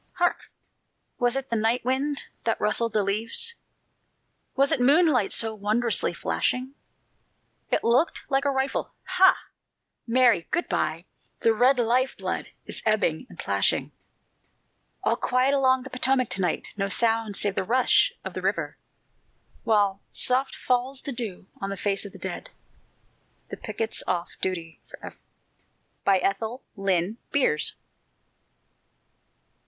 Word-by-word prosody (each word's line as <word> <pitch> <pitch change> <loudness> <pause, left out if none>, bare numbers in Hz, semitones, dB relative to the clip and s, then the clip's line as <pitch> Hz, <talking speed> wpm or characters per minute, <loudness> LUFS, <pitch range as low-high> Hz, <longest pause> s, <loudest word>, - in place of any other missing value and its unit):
Hark! 350 0 0 0.7
was 245 0 +1
it 270 -2 -4
the - - +1
night 225 +2 +1
wind 275 +3 0 0.2
that 225 - 0
rustled 220 +1 0
the 210 -2 +2
leaves? 225 - +2 1.0
Was 275 +1 +3
it - - +2
moonlight 280 - +4
so 225 -1 +1
wondrously 220 +3 +1
flashing? 255 +2 -1 1.0
It - - +1
looked 245 +8 +2
like 270 0 +1
a 285 - +1
rifle... 265 0 -2
"Ha! 375 0 +5 0.7
Mary, 235 -7 +3
good 345 - -1
by!" - - -1 0.4
The 225 - +4
red 255 +4 +4
life 250 +2 +1
blood - - -3 0.2
is - - -6
ebbing 215 -2 +1
and - - -14
plashing. - - +1 1.1
All - - +2
quiet 255 +2 +1
along 260 -2 +3
the 270 - -10
Potomac 255 -1 +1
to 185 +1 -1
night 180 - -1
No 200 -1 -2
sound 225 0 +1
save 205 - +1
the 195 - -1
rush 255 - +3
of - - -5
the - - -5
river, - - -2 0.9
While 205 -3 +2
soft 260 +2 +1
falls 255 +2 -1
the 280 - -4
dew 225 -8 -6
on 195 - -4
the 195 - -4
face 200 +1 -1
of 200 - -8
the - - -12
dead - - -6 1.0
The - - -6
picket's 225 -1 -1
off 175 -1 -1
duty 165 -5 -3
forever! - - -10 0.9
ETHEL 200 +6 +1
LYNN 195 +1 0
BEERS. 255 - +2
235 Hz, 135 wpm, -25 LUFS, 200-260 Hz, 1.1 s, Ha